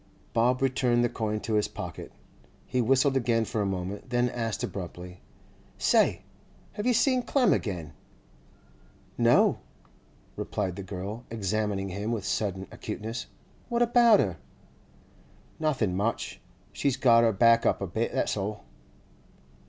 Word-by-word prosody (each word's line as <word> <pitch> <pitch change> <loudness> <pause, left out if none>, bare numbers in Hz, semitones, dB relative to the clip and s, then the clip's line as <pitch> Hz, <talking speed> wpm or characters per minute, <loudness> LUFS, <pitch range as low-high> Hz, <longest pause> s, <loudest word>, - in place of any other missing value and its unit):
Bob 125 +3 +2
returned 125 -2 +2
the 120 - +2
coin 110 -1 -2
to 110 - -4
his 105 -1 +2
pocket. - - -7 0.5
He 125 - 0
whistled 135 +3 +3
again 115 -3 +2
for 110 - -2
a 100 - 0
moment, 95 +4 -4
then 120 0 +1
asked 115 -3 -3
abruptly: 90 -1 -6 0.6
'Say! - - +3 0.5
have 210 - -4
you 250 - +4
seen 255 +2 +3
Clem 255 0 +3
again?' 85 -8 -3 1.2
'No,' - - +4 0.8
replied 95 -2 -3
the 100 - -6
girl, 100 +4 -6
examining 105 -2 -2
him 100 +4 -3
with 110 -5 -3
sudden 95 -3 -2
acuteness. 110 +3 -5 0.4
'What 240 0 +2
about 235 -2 +5
her?' 90 -5 0 1.2
'Nothing 130 - 0
much. 105 +5 -2 0.3
She's 140 -3 0
got 115 -3 +5
her 115 - +4
back 115 +3 +4
up - - +2
a 100 - -2
bit, 110 +6 -2
that's - - 0
all. 105 +1 -4
115 Hz, 135 wpm, -28 LUFS, 100-125 Hz, 1.2 s, about